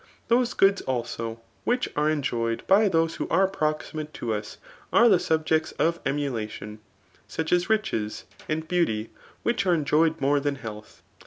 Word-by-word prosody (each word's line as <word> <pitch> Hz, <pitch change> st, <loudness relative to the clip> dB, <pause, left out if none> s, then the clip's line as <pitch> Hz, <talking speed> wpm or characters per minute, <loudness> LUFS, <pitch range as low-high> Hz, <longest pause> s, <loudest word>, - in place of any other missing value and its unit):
Those 240 Hz, +1 st, +2 dB
goods 195 Hz, 0 st, +4 dB
also 115 Hz, -2 st, -3 dB, 0.2 s
which 245 Hz, +1 st, +1 dB
are 150 Hz, +1 st, +2 dB
enjoyed 120 Hz, -6 st, -1 dB
by 205 Hz, +3 st, +5 dB
those 165 Hz, -2 st, +1 dB
who -, -, -3 dB
are 190 Hz, 0 st, +4 dB
proximate 155 Hz, -3 st, -3 dB
to 115 Hz, -2 st, -2 dB
us, 105 Hz, 0 st, -5 dB, 0.3 s
are 235 Hz, -, +6 dB
the 195 Hz, -6 st, +5 dB
subjects 160 Hz, -1 st, +1 dB
of 170 Hz, +1 st, +1 dB
emu 140 Hz, 0 st, -1 dB
btion; 105 Hz, -2 st, -6 dB, 0.5 s
such 160 Hz, +1 st, -2 dB
as 175 Hz, +2 st, +2 dB
riches 210 Hz, -, -1 dB, 0.3 s
and 160 Hz, +1 st, -2 dB
beauty, 115 Hz, -12 st, 0 dB, 0.3 s
which 235 Hz, -4 st, +1 dB
are 175 Hz, -, +5 dB
enjoyed 155 Hz, +1 st, +2 dB
more 140 Hz, +1 st, +3 dB
than 140 Hz, 0 st, -1 dB
health. 110 Hz, -5 st, -9 dB
155 Hz, 160 wpm, -26 LUFS, 120-175 Hz, 0.5 s, are